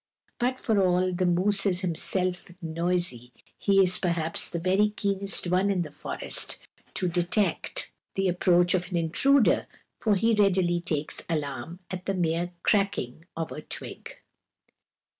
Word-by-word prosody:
But 255 +2 0
for 215 -4 +2
all 185 0 +2
the 180 0 +1
moose 195 +3 +2
is 180 -1 0
himself 180 +1 -1
noisy, 165 -7 -2 0.3
he 195 -1 +4
is 180 0 +2
perhaps 170 -3 -1
the 170 - -3
very 190 +5 +3
keenest 200 -2 -1
one 185 +3 +2
in 185 -3 +1
the 150 - -9
forest - - -2 0.4
to 180 - 0
detect 175 +4 0 0.2
the 195 0 +1
approach 175 0 +3
of 180 -1 0
an 180 - -1
intruder, 225 - +3 0.4
for 215 -3 +2
he 225 +4 +3
readily 190 -4 +3
takes 155 -3 -2
alarm 155 +2 -3
at 185 0 -5
the 195 - 0
mere 175 0 0
cracking 180 - 0
of 165 -1 -3
a 150 - -6
twig. - - -8
180 Hz, 145 wpm, -27 LUFS, 170-195 Hz, 0.4 s, he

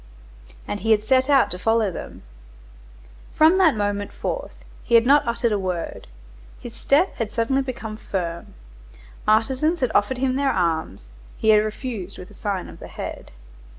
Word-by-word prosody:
And 205 - -3
he 225 - -3
had 215 -1 +4
set 260 +3 +2
out 275 -2 +4
to 180 - -5
follow 225 0 +2
them. - - -9 1.1
From 320 +5 +5
that 325 -9 +5
moment 205 -1 -2
forth - - -5 0.3
he 235 - +2
had 230 0 +6
not 280 0 +4
uttered 235 0 0
a 205 - +1
word. 180 -3 -4 0.5
His 240 - -9
step 300 +10 +2
had 225 -3 -2
suddenly 240 +4 +1
become 230 -5 -6
firm; 170 -6 -5 0.7
artisans 265 +10 +2
had 255 -3 +1
offered 225 +6 +2
him 260 0 0
their 280 -1 +1
arms; 160 - -2 0.3
he 220 - 0
had 210 -1 +6
refused 215 -3 -5
with 180 - -11
a - - -14
sign 200 -4 -3
of - - -12
the - - -9
head. - - -7
225 Hz, 170 wpm, -23 LUFS, 205-265 Hz, 1.1 s, had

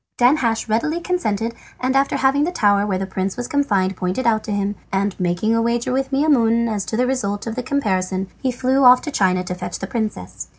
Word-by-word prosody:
Danhasch 245 -3 +2
readily 270 +10 0
consented, 235 - -1 0.3
and 260 +1 0
after 275 +1 +2
having 270 +2 +2
the 340 - 0
tower 205 - +2
where 190 -2 0
the 190 - -2
prince 190 +1 -3
was 245 - -4
confined 205 -11 +1
pointed 185 +8 -2
out 220 -2 +2
to - - -4
him, 205 0 -1 0.2
and 195 0 0
making 180 +5 0
a 230 - +2
wager 235 +1 0
with 265 +1 -1
Maimoune 235 -5 +3
as 210 -3 -2
to 220 - -3
the 250 - +2
result 205 -6 -2
of 225 - -3
the 250 - -3
comparison, 190 -8 -1
he 260 - 0
flew 260 +2 +1
off 250 0 +7
to 300 - -4
China 185 -6 +1
to 180 - -4
fetch 180 -1 -5
the - - -5
princess. 215 - -4
225 Hz, 220 wpm, -20 LUFS, 195-260 Hz, 0.3 s, off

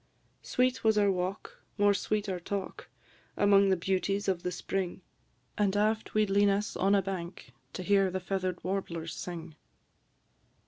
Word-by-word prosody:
Sweet 255 +1 0
was 220 -1 +4
our 205 -1 +4
walk, 185 +2 -4 0.2
more 205 0 +4
sweet 210 +1 -1
our 185 -2 -2
talk, 195 +2 -5 0.5
Among 200 -1 +5
the 190 - +3
beauties 195 +3 -1
of 185 -3 0
the 180 - -2
spring; 185 +1 -3 0.6
An' 205 -1 +2
aft 215 +1 0
we 215 0 +4
'd 195 - -6
lean 200 +1 +4
us 200 +1 -1
on 195 +2 +3
a 195 - +2
bank, 180 -2 -6 0.2
To 185 - -5
hear 195 0 +3
the 185 +1 -2
feather'd 185 -1 -3
warblers 170 -3 -3
sing. 165 -3 -7
195 Hz, 165 wpm, -30 LUFS, 185-205 Hz, 0.6 s, Among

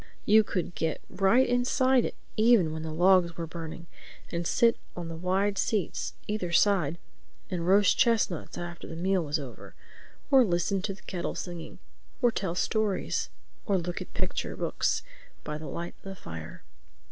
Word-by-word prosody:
You 215 +1 +6
could 180 -4 -3
get 160 -2 -1
right 215 +7 +4
inside 250 +1 +3
it - - -4 0.2
even 215 -8 +4
when 160 - -4
the 160 0 -4
logs 175 0 +4
were 170 - -3
burning 165 0 -7 0.5
and 170 -1 -2
sit 230 -1 +4 0.2
on 175 -1 -5
the 165 - -5
wide 190 +4 0
seats 205 -7 -1
either 210 -5 -2
side 170 -4 +3 0.5
and 175 -2 -2
roast 200 +1 +5
chestnuts 220 -8 +1
after 175 -1 -6
the 165 - -7
meal 185 +1 +1
was 150 0 0
over—or 155 - -2
listen 185 -1 +1
to 195 0 -3
the 190 - -20
kettle 175 -2 -4
singing, 175 -2 -6 0.4
or 245 -3 +4
tell 190 -6 -2
stories, 215 0 0 0.4
or 200 -2 +3
look 175 0 -3
at - - -9
picture - - -2
books - - 0 0.4
by 150 0 -4
the 155 - -7
light 170 +1 -5
of - - -33
the 195 - -6
fire. 80 - -9
180 Hz, 165 wpm, -28 LUFS, 165-205 Hz, 0.5 s, You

